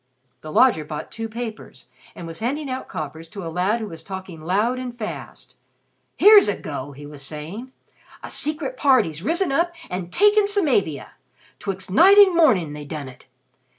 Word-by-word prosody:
The 155 - -8
lodger 235 -6 +4
bought 150 0 -7
two 225 0 -5
papers 220 - -8 0.3
and 170 - -8
was 165 0 -9
handing 270 +5 -3
out 260 +1 -5
coppers 160 +2 -7
to 195 -1 -8
a 165 - -6
lad 190 +6 +1
who 220 - -4
was 165 -6 -10
talking 190 -4 -8
loud 210 +10 0
and 250 -2 -6
fast. 215 -2 -8 0.6
"Here's 420 0 +8
a 205 - -1
go!" 145 -1 -6
he 145 +2 -11
was 145 -1 -10
saying. 160 - -7 0.5
"A - - -7
Secret 305 +12 -2
Party's 255 - +2
risen 335 - 0
up 340 +4 0 0.2
and 180 -1 -5
taken 415 - +4
Samavia! 270 - 0 0.5
'Twixt 195 -1 -5
night 375 - +6
and 395 -3 +7
mornin' 210 - +3
they 150 0 -7
done 145 -2 -6
it! 130 - -16
205 Hz, 175 wpm, -22 LUFS, -, 0.6 s, Here's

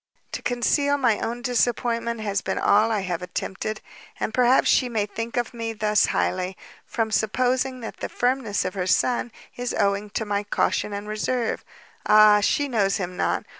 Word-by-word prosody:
To - - -5
conceal 285 +4 +1
my 235 -6 +2
own 240 +1 -4
disappointment 235 -1 0
has, 200 -2 -1
been 190 - -3
all 215 +2 +3
I 215 -2 0
have 180 -2 -3
attempted; 190 +4 -4 0.4
and 220 - -2
perhaps 250 +1 +4
she 255 - +3
may 220 -3 0
think 225 +3 -5
of 240 +1 -1
me 230 -1 -4
thus 210 -1 +2
highly, 185 0 -1 0.3
from 225 -2 -2
supposing 255 +4 0
that 225 - -7
the - - -5
firmness 245 -4 0
of 185 - -2
her 185 -2 -3
son 240 +4 +1 0.3
is 245 0 -3
owing 200 0 +1
to 220 - -2
my 205 -1 -1
caution 205 0 0
and 205 +1 -5
reserve; 225 +3 -2 0.4
ah, 215 -1 +7
she 285 +7 +1
knows 205 -7 +1
him 180 -2 -4
not! - - -1
220 Hz, 175 wpm, -24 LUFS, 205-245 Hz, 0.4 s, ah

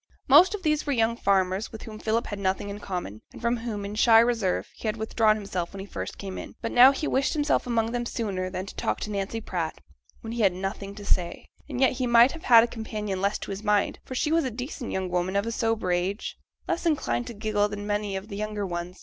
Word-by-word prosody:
Most 330 +9 +7
of 395 - -9
these 305 -1 +1
were 285 - +2
young 230 -1 +2
farmers, 195 -1 +1
with 220 - -9
whom 215 -1 -9
Philip 225 +2 0
had 205 - -5
nothing 195 +1 -1
in 205 - -7
common, 175 - -5
and - - -11
from 235 +1 0
whom, 225 -3 -4
in 200 - -5
shy 225 +1 +6
reserve, 230 -6 +1
he - - -6
had 215 +1 -1
withdrawn 220 0 +2
himself 190 -5 -4
when 195 - -8
he 195 - -6
first - - -6
came 195 -2 -6
in. - - -9
But 230 - -3
now 250 +2 +8
he 280 +2 -3
wished 265 0 +1
himself 295 -3 +1
among 230 -1 +1
them 240 0 -2
sooner 190 -6 -2
than 185 0 -4
set - - -6
to - - -11
talk - - -1
to 210 - -4
Nancy 200 +2 -2
Pratt, 170 -6 -3 0.4
when 225 - -6
he 235 - -2
had 195 -4 +4
nothing 195 +2 -5
to 205 -1 -9
say. 175 -3 -1 0.2
And 245 - -4
yet 265 - +5
he 255 0 -2
might 240 +2 +6
have 330 - -10
had 230 -2 +8
a - - +1
companion 210 -4 -4
less 200 +1 +1
to - - -7
his 195 +1 -5
mind, 210 -1 +1
for 260 - -7
she 300 +4 0
was 330 0 +3
a 260 - -1
decent 250 +2 -6
young 190 -1 -2
woman 180 +1 -1
of 200 +1 +1
a 230 - -2
sober 225 -5 0
age, 180 +4 -1 0.3
less 340 - -1
inclined 280 -6 0
to 235 - -7
giggle 210 -1 0
than 205 0 -6
many 205 -1 -1
of 190 +2 -5
the 205 - -7
younger 210 -1 -3
ones. 175 0 -5
215 Hz, 260 wpm, -26 LUFS, 195-235 Hz, 0.4 s, now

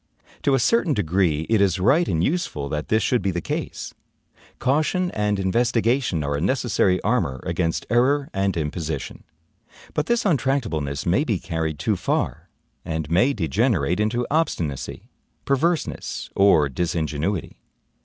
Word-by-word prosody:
To 140 - +3
a - - +2
certain 170 - +2
degree, 85 -4 +1
it 110 -3 +3
is 95 -2 +2
right 145 - +3
and 80 -1 0
useful 90 - -1
that 75 +1 -3
this 110 0 +2
should 120 +2 +2
be 95 - 0
the 90 -2 -1
case. - - -4 0.6
Caution 155 +7 +1
and 105 -1 0
investigation 115 - +1
are 70 0 -1
a 70 - -2
necessary 100 -5 +2
armor 90 - 0
against 80 0 -1
error 135 +4 +2
and 95 -2 0
imposition. 75 -2 -4 0.7
But 150 - -1
this 235 0 +2
untractableness 115 - 0
may - - +2
be - - 0
carried 80 -2 -3
too - - 0
far, - - -2 0.3
and 80 -2 -4
may 110 +11 +4
degenerate 85 - +1
into 115 +3 0
obstinacy, 85 - -1 0.4
perverseness, 160 +5 -1
or 100 -7 +5
disingenuity. 80 +4 -2
100 Hz, 140 wpm, -23 LUFS, 80-130 Hz, 0.7 s, or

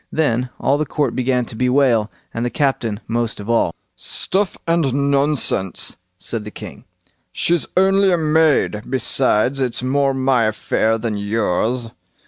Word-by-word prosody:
Then 125 -5 0
all 140 +2 +1
the 155 - 0
court 140 -4 -1
began 125 -1 0
to 115 - -7
bewail, 125 -3 +2 0.2
and 115 - -3
the 120 - 0
captain 120 -6 -1
most 115 -1 -1
of 105 +3 -3
all. 115 -7 +1 0.2
"Stuff 195 -1 -1
and 140 -4 +1
nonsense", 140 - 0 0.2
said 115 +2 -4
the 105 - -7
king; - - -10 0.5
"she's 170 -1 0
only 195 +1 +4
a 175 - +3
maid, 155 -8 +2
besides 130 0 +1
it's 125 -1 -2
more 135 +1 +1
my 130 -3 +2
affair 110 +1 0
than 110 -2 -3
yours." 110 +3 -1
125 Hz, 145 wpm, -19 LUFS, 115-145 Hz, 0.5 s, only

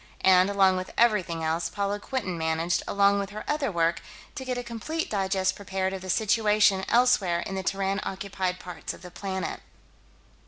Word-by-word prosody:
And, 185 0 +6
along 195 -2 +4
with 185 0 -4
everything 185 -8 +2
else, 165 +1 0
Paula 200 +2 -2
Quinton 205 -6 -3
managed, 160 +1 0
along 200 0 +3
with 200 -1 -3
her 210 +1 -7
other 295 -5 0
work, 165 -1 +1 0.3
to 265 - -6
get 255 -1 -3
a 245 - -3
complete 240 +8 -4
digest 190 -2 0
prepared 190 -1 -2
of 190 - -5
the 185 - -8
situation 210 -1 +3
elsewhere 210 -8 +3
in 195 - -5
the 190 - -2
Terran 195 +1 -1
occupied 190 -1 -3
parts 180 -1 -7
of - - -17
the 180 - -10
planet. 190 0 -4
195 Hz, 180 wpm, -27 LUFS, 185-210 Hz, 0.3 s, And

